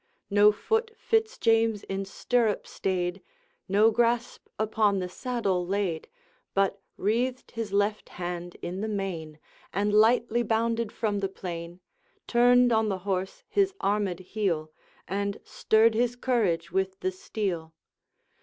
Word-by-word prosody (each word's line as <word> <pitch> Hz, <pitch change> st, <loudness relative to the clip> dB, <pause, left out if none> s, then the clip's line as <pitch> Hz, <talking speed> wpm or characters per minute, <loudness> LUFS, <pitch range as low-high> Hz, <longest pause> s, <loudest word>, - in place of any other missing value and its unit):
No 205 Hz, +1 st, +7 dB
foot 445 Hz, -, 0 dB
Fitz 445 Hz, +1 st, 0 dB
James 225 Hz, -2 st, +2 dB
in 195 Hz, 0 st, -3 dB
stirrup 225 Hz, +2 st, 0 dB
stayed, 185 Hz, 0 st, -2 dB, 0.5 s
No 210 Hz, +3 st, +5 dB
grasp 235 Hz, +1 st, 0 dB
upon 215 Hz, -1 st, +2 dB
the 185 Hz, -1 st, -2 dB
saddle 195 Hz, -3 st, -1 dB
laid, 185 Hz, -3 st, -2 dB, 0.5 s
But 195 Hz, 0 st, +1 dB, 0.2 s
wreathed 245 Hz, +5 st, -1 dB
his 225 Hz, -3 st, -4 dB
left 205 Hz, +1 st, 0 dB
hand 175 Hz, 0 st, -5 dB
in 185 Hz, +3 st, -4 dB
the 220 Hz, -, -1 dB
mane, 180 Hz, -7 st, -4 dB, 0.3 s
And 205 Hz, +2 st, 0 dB
lightly 230 Hz, +2 st, +4 dB
bounded 230 Hz, 0 st, 0 dB
from 210 Hz, -3 st, -1 dB
the 195 Hz, -1 st, -1 dB
plain, 175 Hz, -1 st, -7 dB, 0.4 s
Turned 245 Hz, +1 st, +5 dB
on 220 Hz, -1 st, +3 dB
the 195 Hz, -, -1 dB
horse 190 Hz, -1 st, -2 dB
his 390 Hz, -1 st, +1 dB
armed 200 Hz, -3 st, 0 dB
heel, 180 Hz, -6 st, -2 dB, 0.4 s
And 200 Hz, +2 st, -2 dB
stirred 220 Hz, +1 st, +3 dB
his 240 Hz, +2 st, +1 dB
courage 220 Hz, -10 st, 0 dB
with 190 Hz, +1 st, -1 dB
the 185 Hz, -, 0 dB
steel. 180 Hz, -4 st, -4 dB
205 Hz, 135 wpm, -27 LUFS, 185-230 Hz, 0.5 s, No